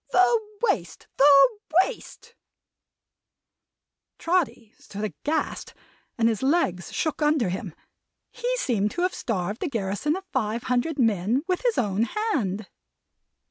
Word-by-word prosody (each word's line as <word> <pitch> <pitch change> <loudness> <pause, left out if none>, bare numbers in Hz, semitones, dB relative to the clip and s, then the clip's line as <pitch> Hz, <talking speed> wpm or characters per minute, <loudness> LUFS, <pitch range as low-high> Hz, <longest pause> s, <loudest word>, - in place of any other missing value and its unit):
The 410 +6 +4 0.2
Waste, - - -1
the 285 - +6 0.2
Waste!" 470 0 -9 1.8
Trotty 270 -11 -1
stood 205 +2 -8
aghast, 295 +9 -3 0.4
and 230 -1 +3
his 225 -3 0
legs 265 - 0
shook 315 -1 -2
under 295 -9 +2
him. 185 -2 -5 0.6
He - - -2
seemed 215 - 0
to 350 - -1
have 365 - +1
starved 205 -2 -3
a 370 - 0
garrison 225 - -1
of 380 +1 -7
five 230 -2 -1
hundred 250 +5 0
men 225 +1 +1
with 365 -1 0
his 485 -2 +1
own 210 0 +1 0.3
hand. 205 - -1
250 Hz, 125 wpm, -25 LUFS, 210-340 Hz, 1.8 s, the